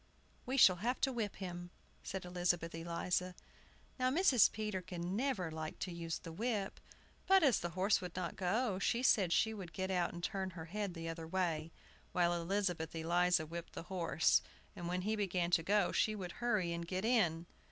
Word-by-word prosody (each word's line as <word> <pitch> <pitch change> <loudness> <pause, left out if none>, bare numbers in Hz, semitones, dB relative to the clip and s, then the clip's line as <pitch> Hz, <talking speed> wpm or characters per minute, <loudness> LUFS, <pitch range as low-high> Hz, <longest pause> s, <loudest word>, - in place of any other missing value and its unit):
"We 260 +2 -1
shall 185 -8 +7
have 240 +7 -1
to 270 - +2
whip 220 -4 -2
him," 175 -2 -6 0.3
said 190 -2 -5
Elizabeth 175 -1 0
Eliza. 170 +2 -2 0.6
Now 255 0 +3
Mrs. 270 - +5
Peterkin 185 -4 -4
never 230 -9 -1
liked 155 0 -5
to 185 - -3
use 165 -1 -3
the 165 - -9
whip; 205 +2 -2 0.5
but, 385 -2 +6
as 265 -8 +4
the 175 - -3
horse 195 +3 +3
would 180 -2 -7
not 180 -2 -3
go, 195 +2 0
she 235 +5 +1
said 195 -8 +4
she 220 +5 +3
would 185 -5 -8
get 190 0 -2
out 180 -2 +1
and 175 0 -8
turn 190 0 -2
her 160 - -6
head 200 +1 -4
the 165 0 -5
other 165 0 -5
way, 165 -3 -1 0.4
while 175 -1 +3
Elizabeth 175 -2 -1
Eliza 170 +1 +2
whipped 170 +2 -7
the - - -6
horse, 165 -3 +3 0.3
and 175 - -5
when 180 +1 -1
he 215 +2 0
began 180 -4 0
to 170 - +4
go 200 +2 +2
she 215 - +2
would 185 -4 -5
hurry 210 -8 +1
and 170 0 -4
get 185 +3 -2
in. 175 -9 +2
180 Hz, 190 wpm, -36 LUFS, 170-205 Hz, 0.6 s, shall